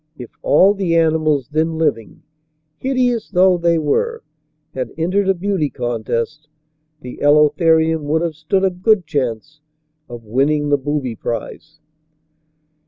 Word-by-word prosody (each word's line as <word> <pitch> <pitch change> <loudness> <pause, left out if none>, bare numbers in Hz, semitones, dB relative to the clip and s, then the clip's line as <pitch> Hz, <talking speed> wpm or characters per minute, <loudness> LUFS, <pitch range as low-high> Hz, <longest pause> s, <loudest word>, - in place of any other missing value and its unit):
If 125 -2 -10
all 195 +2 +4
the 190 -4 -1
animals 155 -4 +1
then 160 +1 -1
living, 115 -9 -2 0.6
hideous 250 -4 -1
though 185 -1 +3
they 170 0 +2
were, 460 - -1 0.5
had - - -4
entered 190 +4 0
a 195 - +3
beauty 185 -4 -1
contest, 120 +5 -4 0.5
the 125 -2 -9
Elotherium 160 +2 +3
would 160 +3 0
have 170 -2 -2
stood 160 +5 -1
a 190 - +1
good 185 +1 +1
chance 145 +2 -4 0.5
of 120 -1 -9
winning 145 +6 0
the 145 - +3
booby 135 -4 -3
prize. 120 +8 -6
155 Hz, 130 wpm, -18 LUFS, 145-180 Hz, 0.6 s, all